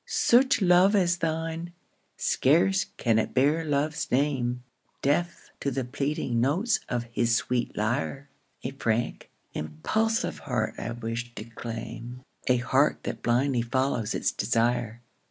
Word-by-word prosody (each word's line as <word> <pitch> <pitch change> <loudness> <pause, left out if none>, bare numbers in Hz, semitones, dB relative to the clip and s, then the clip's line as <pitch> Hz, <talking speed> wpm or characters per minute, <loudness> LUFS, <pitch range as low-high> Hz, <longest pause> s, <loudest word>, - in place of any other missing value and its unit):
Such 250 -2 +4
love 180 +3 +5
as 175 -3 +3
thine, 165 +1 -3 0.4
scarce 175 +8 +3
can 115 -2 +2
it - - -2
bear 145 +5 +3
love's 150 0 -1
name, 125 -3 0 0.4
Deaf 175 +5 0
to 140 - -1
the 135 -2 -2
pleading 135 -2 -1
notes 185 - +2
of 120 -2 -1
his 115 0 +2
sweet 125 +1 -1
lyre, 130 +6 -1 0.4
A 130 - -3
frank, 120 -3 -2 0.2
impulsive 220 - -1
heart 110 -4 -1
I - - -3
wish 120 +1 -5
to - - -6
claim, 115 +2 -7 0.2
A 125 - +4
heart 130 +4 +2
that - - -4
blindly 125 +1 +2
follows 120 -2 0
its - - +1
desire. 115 +1 0
130 Hz, 135 wpm, -27 LUFS, 120-160 Hz, 0.4 s, love